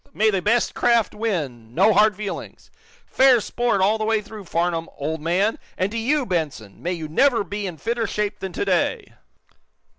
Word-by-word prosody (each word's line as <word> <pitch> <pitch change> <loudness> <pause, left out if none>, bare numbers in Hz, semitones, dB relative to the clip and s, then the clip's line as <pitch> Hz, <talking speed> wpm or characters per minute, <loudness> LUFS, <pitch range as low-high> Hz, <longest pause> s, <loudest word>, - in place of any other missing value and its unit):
May 220 +1 +3
the 195 -2 0
best 230 +5 +1
craft 235 -2 +2
win, 140 - -3
no 205 +4 +5
hard 210 +1 +4
feelings! 205 -1 -7 0.3
Fair 260 -2 +5
sport 235 -1 0
all 210 +3 +3
the - - -1
way 220 0 +2
through, 210 -1 -10
Farnum, 170 -1 -1
old 155 +2 -3
and 195 +6 +1 0.3
to - - -6
you, 275 +4 +1
Benson 150 - -3
may 175 +2 -2
you 160 -3 -5
never 235 - +3
be 205 +1 -4
in 175 -3 -7
fitter 230 +5 -2
shape 210 0 -2
than 190 - -5
to 405 - -2
day!" 440 0 0
205 Hz, 180 wpm, -22 LUFS, 170-225 Hz, 0.3 s, no